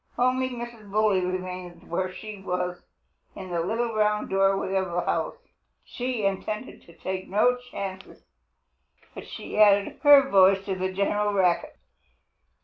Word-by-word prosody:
Only 255 +1 +2
Mrs. 235 -4 -8
Bully 205 -2 +2
remained 180 -1 -5
where 185 +2 -2
she 210 +1 -9
was, 180 -1 -3 0.5
in 185 -2 -8
the 170 - -1
little 225 +6 -1
round 210 -1 0
doorway 195 0 +2
of 190 -1 +1
her 175 0 -1
house. - - -1 0.5
She 245 -4 -3
intended 210 +5 -3
to 170 - -15
take 185 0 -4
no 215 +6 +3
chances, 200 -6 -8 0.9
but - - -9
she - - -6
added 205 -1 +4
her 285 -2 +7
voice 195 -3 +5
to 195 - -2
the 185 0 -2
general 205 +2 0
racket. 180 -3 +1
195 Hz, 140 wpm, -26 LUFS, 185-215 Hz, 0.9 s, her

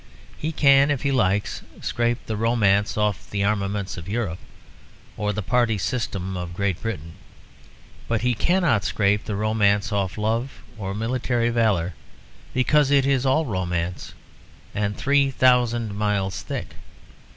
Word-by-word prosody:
He 155 - -3
can, 140 -2 +5
if 145 -3 -1
he 140 - +1
likes, 105 -6 +1 0.2
scrape 120 +1 -1
the 110 - -3
romance 105 -3 +2
off 105 -2 -1
the 100 -1 -1
armaments 100 -1 -1
of 85 +1 -7
Europe 100 -6 -2 0.8
or 105 -1 -1
the 105 0 -3
party 120 0 +2
system 95 -4 -3
of 90 -1 -5
Great 100 -2 -1
Britain. 85 -8 -5 0.9
But 115 -2 0
he 125 +1 +2
cannot 165 - +2
scrape 100 +3 +1
the 105 - -3
romance 105 0 +1
off 100 -2 -1
love 115 +5 -2
or 100 -2 -5
military 120 +1 0
valour, 105 -7 +1 0.6
because 140 +2 +3
it 140 -1 +4
is 135 -1 +2
all 155 +5 +2
romance, 90 - -3 0.6
and 105 0 -2
three 140 0 +3
thousand 120 -4 +2
miles 100 -3 -1
thick. - - -5
110 Hz, 140 wpm, -23 LUFS, 100-125 Hz, 0.9 s, can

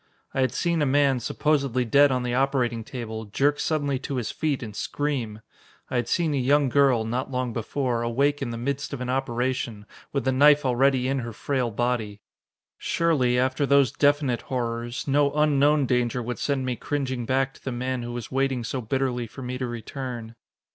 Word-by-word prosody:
I 135 - 0
had 130 - +2
seen 170 -2 0
a - - +3
man, 140 -1 +3
supposedly 135 -1 0
dead 140 +4 +5
on 125 -1 0
the 120 -1 -2
operating 125 -3 +1
table, 110 -2 -6
jerk 145 +8 +1
suddenly 145 -4 0
to 140 +1 -4
his 120 -3 -2
feet 150 -5 -1
and 105 -3 -8
scream. 125 -8 -3 0.5
I 130 - 0
had 120 - 0
seen 165 -4 +1
a - - 0
young 140 +2 +3
girl, 130 -4 +3
not 125 +4 -2
long 125 -2 -2
before, 120 +1 -1
awake 140 +5 +1
in 135 - -2
the 115 - -4
midst 140 +4 -3
of 135 - -5
an 125 0 -2
operation, 125 -4 -2 0.3
with 140 - -1
the 130 - +3
knife 145 +2 +5
already 130 0 +2
in 135 0 0
her 120 -1 -5
frail 130 +1 -1
body. 115 -2 -2 0.6
Surely, 140 -8 +1
after 130 +2 +1
those 140 -4 +4
definite 145 -4 +2
horrors, 120 -2 -3
no 140 +1 +3
unknown 150 -1 +3
danger 125 -1 0
would 120 +1 -4
send 140 -2 -1
me 125 -1 -1
cringing 130 -3 -3
back 135 0 +1
to - - -19
the 135 - -3
man 125 +1 -2
who 120 0 -5
was 120 -1 -6
waiting 135 -2 0
so 125 +3 -3
bitterly 125 0 -1
for 130 +4 -10
me 125 +1 -4
to 130 - -2
return. 120 0 -6
130 Hz, 195 wpm, -25 LUFS, 120-140 Hz, 0.6 s, dead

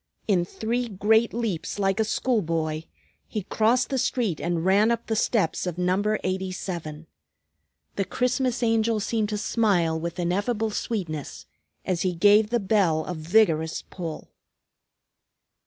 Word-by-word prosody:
In 185 -5 +2
three 235 +6 -2
great 220 +3 +2
leaps, 220 -8 -3
like 195 +1 +1
a - - +4
schoolboy, 165 -9 -1 0.4
he 215 -3 -4
crossed 230 +5 +2
the 265 - +1
street 225 - 0
and 170 0 -1
ran 200 +4 +4
up 235 0 -1
the 220 - -1
steps 200 -6 +1
of 175 -1 -3
Number 190 +4 +1
87. 185 -4 -4 0.9
The 195 - +1
Christmas 250 +1 0
Angel 225 -1 +2
seemed 215 0 -1
to 210 - -2
smile 190 -8 +1
with 170 +1 -5
ineffable 205 +6 0
sweetness 170 - -4 0.4
as 180 -2 -1
he 185 -2 0
gave 210 +4 +5
the 240 0 +1
bell 190 -6 +2
a 180 - -4
vigorous 160 -1 +2
pull. 165 -4 -7
200 Hz, 140 wpm, -25 LUFS, 170-225 Hz, 0.9 s, gave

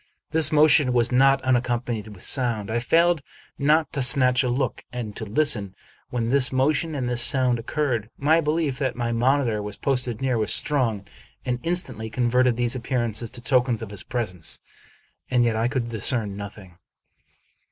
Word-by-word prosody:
This 160 -2 +4
motion 150 -4 +4
was 120 0 +1
not 135 +1 +3
unaccompanied 120 -3 -1
with 105 -4 -11
sound. 115 -6 0
I 120 - 0
failed 165 +5 +2 0.4
not 150 +2 +2
to 140 - -2
snatch 125 -1 +4
a 125 - -1
look 130 0 -2
and 115 -4 -6
to 110 - -6
listen 105 -5 0 0.3
when 115 -2 -2
this 130 0 +4
motion 150 +4 0
and 130 -3 -3
this 120 -1 +2
sound 125 -1 +2
occurred. 120 -3 -2
My 160 +4 +2
belief 150 -3 -1
that 130 -4 -2
my 120 -1 -2
monitor 120 -2 +1
was 105 0 -6
posted 125 -4 0
near 130 -3 -1
was 110 - 0
strong, 115 -9 +1 0.4
and 125 -1 -2
instantly 130 -11 -1
converted 125 +1 +1
these 120 -1 0
appearances 120 -2 -2
to 120 - -9
tokens 125 -2 +1
of 105 - -8
his 100 - -5
pres 120 -7 -4
ence; 85 -3 -3 0.7
and 125 -1 +2
yet 115 -2 0
I 115 +2 0
could 125 -2 -3
discern 110 -2 0
nothing. 100 -3 -10
125 Hz, 175 wpm, -23 LUFS, 115-135 Hz, 0.7 s, This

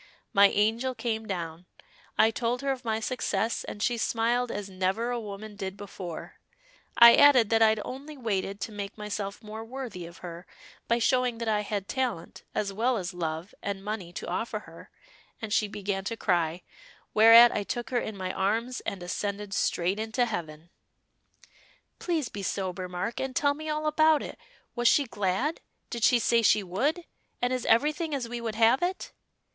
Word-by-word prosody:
My 200 0 +7
angel 225 +6 +1
came 225 -1 -3
down; 175 -2 -5 0.5
I 220 - +5
told 240 +2 -2
her 275 - +1
of 260 -1 -4
my 220 -2 -1
success, 225 -1 -1
and 205 - -5
she 240 -1 +1
smiled 235 +2 +1
as 205 -1 -4
never 190 +5 -1
a 240 - -1
woman 210 0 -8
did 195 -1 -5
before; 190 -4 -8 0.6
I 235 0 +10
added 260 -7 +6
that 225 0 +4
I'd 220 -1 +5
only 285 +3 -8
waited 200 -4 -2
to 220 - -4
make 205 0 -6
myself 210 0 -5
more 220 +1 -7
worthy 225 -8 -7
of 170 - -13
her, 175 +1 -8 0.4
by 235 - +3
showing 250 0 +1
that 230 0 -4
I 210 -1 +2
had 205 -1 -3
talent, 245 -11 -3
as 200 -1 -1
well 235 +4 +1
as 185 -1 -4
love 165 +1 -4
and 200 -1 -4
money 205 -4 -4
to - - -6
offer 215 +4 -3
her, 165 -3 -14 0.5
and 220 -2 -4
she 215 - +2
began 200 -1 -3
to 230 +2 -3
cry, 175 -3 0 0.5
whereat 230 +2 +9
I - - -1
took 240 +4 -4
her 245 - +2
in 215 -3 -5
my 185 -1 -3
arms 230 +6 -1
and 190 -3 -5
ascended 200 +2 -3
straight 185 +2 0
into 220 +3 0
heaven." 170 -6 -6 1.3
"Please 325 -7 -1
be 205 - -7
sober, 185 -1 -3
Mark, 180 +6 -3
and 265 -1 -3
tell 285 -2 +3
me 310 +2 -7
all 305 0 -2
about 310 0 +4
it. - - -8 0.4
Was 240 -1 +2
she 285 - +5
glad? 210 - -1 0.3
Did 235 -2 -4
she 245 - +6
say 235 0 +3
she 210 -1 +4
would? 275 - -1 0.3
And 245 +1 0
is 255 -2 -2
everything 300 +6 +2
as 255 -4 -3
we 240 0 -5
would 225 -2 -3
have 230 +3 +4
it?" 360 +2 -2
220 Hz, 185 wpm, -28 LUFS, 195-245 Hz, 1.3 s, I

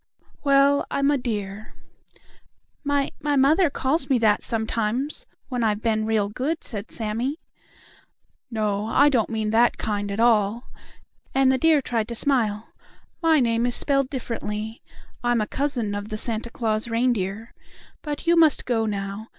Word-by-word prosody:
"Well, 280 0 +4
I'm 280 +1 +1
a 290 - +2
deer." 210 -4 -5 1.1
"My 285 -1 0
my 290 0 0
mother 300 +6 +4
calls 270 +1 +1
me 265 - +4
that, 215 -3 +3
sometimes, 235 - -2 0.2
when 250 -3 -2
I've 215 -1 0
been 220 -2 +1
real 215 -2 +1
good," 270 +10 -3
said 210 -2 -7
Sammie. 235 +7 -3 1.1
"No, 215 -2 -1
I 285 +5 +4
don't 240 -7 +1
mean 220 -1 -2
that 235 +2 +3
kind 205 -1 -2
at 200 - -4
all," 230 0 +2 0.6
and 265 -1 +4
the 260 - +1
deer 315 -2 +4
tried 225 -3 -1
to 235 - -5
smile. 225 -5 0 0.5
"My 325 -2 +4
name 235 -1 +1
is 245 - -1
spelled 275 -2 +1
differently. 220 -4 -5 0.4
I'm 240 -1 +2
a 215 - 0
cousin 250 -5 -2
of 205 +1 -5
the 215 - -3
Santa 230 +1 -2
Claus 220 -1 -1
reindeer. 230 -2 -1 0.5
But 295 +1 -5
you 340 0 +4
must 320 -4 +4
go 225 -3 0
now. 200 +1 -4
235 Hz, 155 wpm, -24 LUFS, 215-275 Hz, 1.1 s, Well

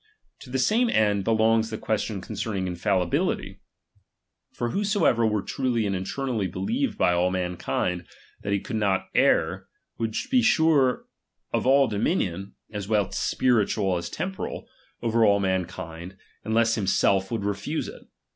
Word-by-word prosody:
To 130 - -12
the 130 - -1
same 225 - +2
end 105 - +2
be - - 0
longs 110 0 +3
the 110 - -4
question 105 -2 -2
concerning 105 -2 -3
infalUbiUfy. 90 0 -1 0.9
For 120 0 -3
whosoever 200 - +2
were 105 -2 0
truly 125 -4 -1
and 100 -1 -1
internally 110 +2 -2
beheved 235 - -1
by 90 - +3
all 90 +1 +2
mankiud, 90 -1 -2 0.3
that 100 - -3
he 100 - +2
could 110 - -4
not 100 -3 0
err, - - +2 0.3
would 110 -1 -2 0.2
be 255 -2 +5
sure 160 - +3 0.5
of - - 0
all 135 0 +5
dominion, 100 - -1 0.2
as 105 -2 -5
well 105 -2 +1
temporal 125 -3 +1 0.4
as 85 - -3
spiritual, 190 +4 -5 0.4
over 115 0 +2
all 100 -2 +5
mankind, 90 -2 -3 0.3
unless 115 +1 +2
himself 95 -2 +2
would 110 -4 -3
refuse 105 +10 -2
it. - - -10
110 Hz, 145 wpm, -25 LUFS, 95-125 Hz, 0.9 s, be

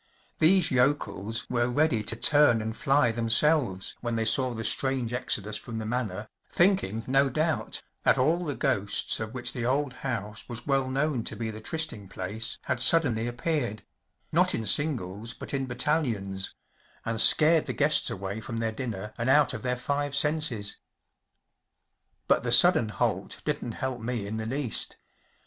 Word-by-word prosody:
These 170 0 +4
yokels 125 -5 0
were 120 -1 0
ready 145 -3 +1
to 115 - -3
turn 145 -2 +5
and 110 0 -4
fly 140 -4 +2
themselves 115 -2 +2
when 120 -1 -3
they 115 0 -1
saw 125 +2 +1
the 115 - -5
strange 130 -1 0
exodus 110 -4 -2
from 115 -2 -8
the 110 - -4
Manor, 110 -3 -3 0.2
thinking, 175 - +1
no 135 +1 +2
doubt, 155 +4 -1 0.2
that - - +3
all 160 +7 +1
the 145 -5 -3
ghosts 105 -7 0
of 110 +2 -6
which 125 - -1
the 120 - -4
old 135 +2 0
house 110 -5 -4
was 120 -1 -6
well 135 -2 0
known 135 -2 -1
to - - -5
be 110 +1 -4
the 110 0 -9
trysting 155 -7 -3
place 100 +4 -4
had - - -2
suddenly 125 -9 +5
appeared‚ÄĒnot 120 -3 -2
in 110 - -4
singles 115 -5 0
but - - -7
in 135 -1 -2
battalions‚ÄĒand 115 -5 -3
scared 155 +6 +5
the - - -2
guests 150 +1 +1
away 100 +3 -5
from 115 - -6
their 115 0 -1
dinner 110 -3 -6
and 115 +2 -1
out 145 -1 +4
of 110 - -6
their 125 0 -2
five 145 +2 -2
senses. 150 -9 +1 1.5
But - - +3
the - - -3
sudden 110 - +6
halt - - -2
didn’t 115 - -3
help 130 -2 -4
me 115 -2 -3
in 105 +2 -5
the 110 0 -4
least. 130 -1 -2
120 Hz, 165 wpm, -27 LUFS, 110-145 Hz, 1.5 s, sudden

